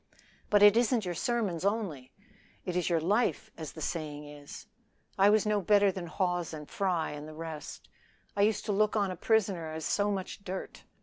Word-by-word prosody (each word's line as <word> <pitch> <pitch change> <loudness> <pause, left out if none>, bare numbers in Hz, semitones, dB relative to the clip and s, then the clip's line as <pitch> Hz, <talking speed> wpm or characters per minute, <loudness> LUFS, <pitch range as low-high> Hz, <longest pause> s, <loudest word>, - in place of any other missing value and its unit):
"But 205 -1 +5
it 205 0 +8
isn't 235 -2 +2
your 180 - -2
sermons 205 -4 -1
only 195 - -2 0.5
it 180 -3 -3
is 180 -1 +1
your 170 -2 +2
life, 215 +5 +1
as 155 -3 -7
the 160 - -9
saying 150 -2 -4
is. 145 -1 -10 0.5
I 195 +1 +5
was 215 0 +4
no 210 -1 +1
better 200 +1 +4
than 180 -2 -6
Hawes 175 -3 -1
and 150 -1 -8
Fry 180 -5 -1
and 150 +1 -7
the 155 - -10
rest. 160 -1 -7 0.5
I 200 - +1
used 215 +1 +2
to 210 - -1
look 210 +2 +2
on 200 -3 +1
a - - -4
prisoner 190 -5 +1
as 160 0 -5
so 205 0 +1
much 195 0 -4
dirt. 190 0 -6
185 Hz, 195 wpm, -30 LUFS, 160-205 Hz, 0.5 s, it